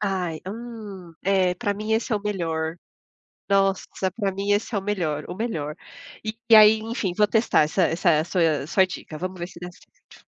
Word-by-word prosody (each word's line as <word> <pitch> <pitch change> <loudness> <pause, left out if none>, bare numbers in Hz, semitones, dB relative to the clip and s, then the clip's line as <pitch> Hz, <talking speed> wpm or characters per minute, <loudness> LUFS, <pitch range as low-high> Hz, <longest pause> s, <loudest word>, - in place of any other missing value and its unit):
Ai, 185 -6 -2
hum! 205 -5 -8
É, 190 -2 +2
para 205 +2 -2
mim, 215 +2 -3
esse 225 +1 0
é - - +3
o - - -5
melhor. 165 -5 -2 0.7
Nossa, 195 -1 +2 0.3
pra 200 -4 -1
mim, 200 +2 -1
esse 210 +2 0
é - - +2
o - - -5
melhor 170 -7 -2
o - - -5
melhor. 165 -9 -3 0.5
E 220 +1 -4 0.2
aí, 215 +1 +8
enfim, 220 -4 -3
vou 210 - +4
testar 220 -6 +3
essa 160 +5 +1
essa 165 -2 +2
sua 165 -5 +1
sua 190 +4 +3
dica. 155 -4 -8
Vamos 185 +1 -5
ver 175 - -4
se 170 - -13
dá 180 - -6
certo. 180 - -21
190 Hz, 190 wpm, -24 LUFS, 170-210 Hz, 0.7 s, aí